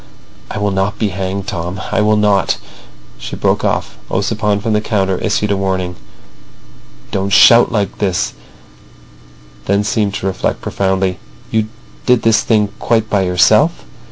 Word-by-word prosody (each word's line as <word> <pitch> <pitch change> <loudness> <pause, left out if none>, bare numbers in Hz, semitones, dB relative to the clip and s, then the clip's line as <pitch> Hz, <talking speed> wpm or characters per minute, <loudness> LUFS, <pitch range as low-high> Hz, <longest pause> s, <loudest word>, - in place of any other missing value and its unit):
"I - - -5
will 105 -1 0
not 95 +2 -1
be 105 -1 0
hanged, 95 +1 -4
Tom. 90 -1 -4
I - - +2
will 105 0 +3
not—" 105 -3 +2 0.6
She - - -6
broke - - 0
off. - - -2
Ossipon 105 +1 0
from 110 +2 -1
the 105 - +2
counter 95 -4 0
issued 105 -1 0
a - - +2
warning: 95 -2 -2 1.2
"Don't 95 0 -1
shout 120 +5 +6
like 105 -4 -2
this," 95 -4 0 1.3
then 100 +1 +1
seemed 105 -2 0
to - - -4
reflect 95 -1 -1
profoundly. 95 -1 -1 0.3
"You 110 -1 +1 0.4
did 125 -2 +3
this 115 -1 +4
thing 105 -3 +2
quite 110 -2 0
by 100 - +2
yourself?" 90 -1 +3
100 Hz, 150 wpm, -16 LUFS, 95-105 Hz, 1.3 s, shout